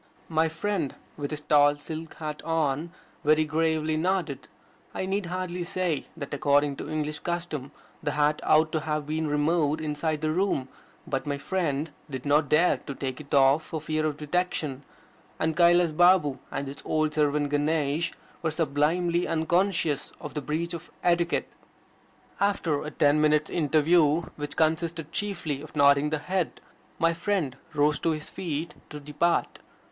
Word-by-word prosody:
My 160 0 +2
friend, 165 -2 -2 0.2
with 145 -1 -4
his 150 -1 -4
tall 145 -1 +4
silk 160 +2 -7
hat 155 -1 -5
on, 160 0 -1 0.3
very 155 +1 +4
gravely 155 0 0
nodded. 160 -6 -1 0.5
I - - -2
need 195 0 -1
hardly 180 0 -3
say 175 -3 -1
that 140 -3 -6
according 145 0 +2
to - - -6
English 150 -1 -2
custom 170 -6 -4 0.3
the 145 - -1
hat 150 0 +2
ought 155 +1 +4
to 155 - 0
have 150 -1 -2
been 155 +1 -1
removed 150 +1 +1
inside 155 0 -2
the 155 0 +1
room. 160 -7 0 0.4
But 135 +2 -3
my 145 -1 -1
friend 155 -2 -1 0.2
did 130 -1 -6
not 145 0 +3
dare 165 +4 +4
to 140 - -8
take 130 +1 -4
it 145 - -15
off 135 +3 +5
for 160 - -5
fear 155 +1 -1
of 150 -1 -3
detection; 150 -3 -2 0.5
and 160 0 0
Kailas 175 0 +5
Balm 165 -4 +4
and 140 - -4
his 140 - -7
old 155 -1 0
servant 150 -1 +1
Ganesh 150 +1 +1 0.3
were 165 - 0
sublimely 165 +3 +1
unconscious 165 -2 0
of - - -7
the 150 - -3
breach 160 +5 -2
of 170 +1 -7
etiquette. 175 0 +2 0.9
After 180 -7 +1
a 150 - -4
ten 150 0 +3
minutes' 150 0 +3
interview, 155 0 +3
which 145 -1 -5
consisted 160 0 0
chiefly 175 -9 -3
of 155 - -12
nodding 140 0 +5
the 155 - 0
head, 180 +3 -2 0.4
my 165 0 +3
friend 170 -6 -1 0.2
rose 145 0 +3
to - - +1
his 155 -1 -3
feet 160 -2 -3 0.2
to 150 - -7
depart. 150 +4 0
155 Hz, 160 wpm, -27 LUFS, 145-170 Hz, 0.9 s, off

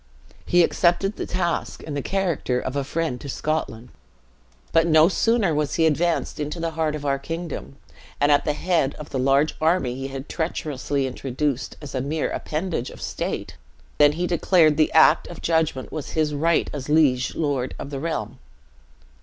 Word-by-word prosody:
He 175 -1 +5
accepted 185 +4 +2
the - - -5
task, 175 -2 -2
in 155 - -6
the 145 - -2
character 170 -9 -1
of 130 +2 -4
a 140 - 0
friend 145 -2 -2
to 140 - -7
Scotland; 130 -5 -3 0.8
but 165 +1 +4
no 160 0 +6
sooner 210 -1 +2
was 150 -1 -1
he 165 - +3
advanced 165 +2 0
into 150 +3 -3
the 165 0 -2
heart 160 -1 -1
of 145 -1 -6
our 140 -1 +1
kingdom, 165 -1 -6 0.4
and 145 +1 +3
at 145 - +4
the 150 - 0
head 160 -3 0
of 150 - -10
the 130 - -2
large 135 +4 +3
army 160 -6 +2
he 135 +1 -5
had 135 +1 -7
treacherously 145 -4 -2
introduced 130 +1 -3
as 145 - -8
a 130 - -1
mere 150 +4 -2
appendage 155 -5 -3
of - - -12
state, - - -4 0.4
than 145 0 +6
he 175 +3 -1
declared 170 -3 +3
the 155 0 +2
act 160 - +5
of 175 - -9
judgement 160 -5 0
was 155 -3 -6
his 155 -1 +1
right 160 +3 +1
as 145 -1 -6
liege 145 -5 +3
lord 140 -5 -1
of 140 - -7
the 140 - -4
realm! 130 -6 -4
150 Hz, 180 wpm, -23 LUFS, 140-165 Hz, 0.8 s, no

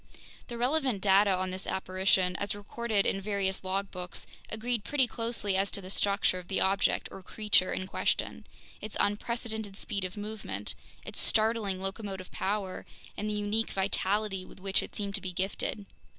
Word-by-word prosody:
The 240 - -5
relevant 260 -2 +2
data 200 +1 +5
on 185 -1 +1
this 185 +1 -4
apparition, 185 -1 +2
as 200 0 -1
recorded 210 0 0
in 195 - +1
various 195 -1 0
logbooks, 185 -1 -3 0.2
agreed 225 0 -1
pretty 285 -3 +3
closely 230 -4 -1
as 195 +1 +2
to - - -1
the 185 -1 -6
structure 200 -2 +2
of 180 - -11
the 190 - +1
object 195 +1 +3
or 195 - -8
creature 210 -1 +3
in 185 - -1
question, 190 - -1 0.3
its 215 - -4
unprecedented 220 -1 -1
speed 200 -3 -2
of 185 +2 -5
movement, 205 - -4 0.3
its - - -5
startling 215 -3 +3
locomotive 195 -1 -4
power, 195 -1 -1 0.3
and 210 +1 -2
the - - 0
unique 210 +2 +1
vitality 195 0 +1
with 185 - -13
which 195 +1 +2
it - - -8
seemed 200 -1 -2
to 200 - -1
be 185 - -3
gifted. 195 +2 -2
200 Hz, 165 wpm, -31 LUFS, 190-215 Hz, 0.3 s, data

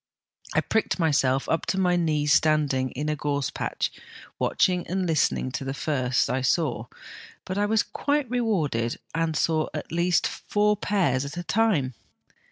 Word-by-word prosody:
I - - +4
pricked 220 - 0
myself 135 -5 +2
up 165 - -1
to 190 - 0
my 180 -1 +3
knees 150 -4 +2
standing 145 -4 +2
in 145 +4 -4
a 150 - 0
gorse 145 -1 -2
patch - - -2 0.5
watching 180 -1 +1
and 185 +1 -1
listening 155 -5 +1
to 125 +1 -4
the 135 0 -4
first 130 -4 0
I 130 - -1
saw, 130 -5 0 0.6
but 185 +2 -3
I 205 - +2
was 220 0 +2
quite 290 -1 -1
rewarded, 175 - 0 0.2
and 165 -1 0
saw 155 +1 +1
at 150 - -5
least 170 +1 +2
four 210 0 +1
pairs 180 -11 +1
at 140 +4 -7
one 175 - -3
time. 180 - +1
160 Hz, 165 wpm, -25 LUFS, 135-185 Hz, 0.6 s, I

